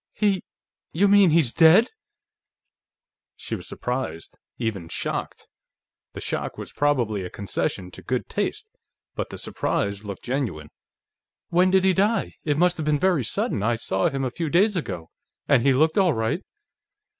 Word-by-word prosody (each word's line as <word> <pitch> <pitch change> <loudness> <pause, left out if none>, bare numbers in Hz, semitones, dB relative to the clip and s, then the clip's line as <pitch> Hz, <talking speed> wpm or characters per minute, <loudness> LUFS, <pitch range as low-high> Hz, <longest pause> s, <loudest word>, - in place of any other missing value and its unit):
"He.... 200 -3 +1 0.5
You 195 +5 +3
mean 200 -2 +6
he's 155 -6 +3
dead?" 170 +8 +6 1.4
She - - -7
was - - -8
surprised, 125 -10 -4 0.2
even 105 -8 -3
shocked. - - -4 0.7
The - - -7
shock - - -3
was - - -7
probably 120 -9 +1
a 90 - -5
concession 95 -2 -3
to - - -11
good - - -2
taste, - - -3 0.5
but - - -4
the - - -8
surprise 100 0 -2
looked 100 -2 -7
genuine. 115 - -3 0.8
"When 180 +2 +4
did 190 0 +3
he 190 0 +4
die? 205 +5 +1
It 145 -2 0
must 180 +2 +3
have 155 - -3
been 150 -1 +3
very 175 -4 +2
sudden; 105 -1 0
I 115 +3 +1
saw 170 +9 0
him 135 -2 -2
a 125 - -2
few 165 +3 -3
days 200 +6 +3
ago, 95 - -4 0.4
and 135 -4 +4
he 140 - +4
looked 155 +7 +3
all 185 -5 +4
right. 110 0 -1
145 Hz, 160 wpm, -24 LUFS, 110-180 Hz, 1.4 s, mean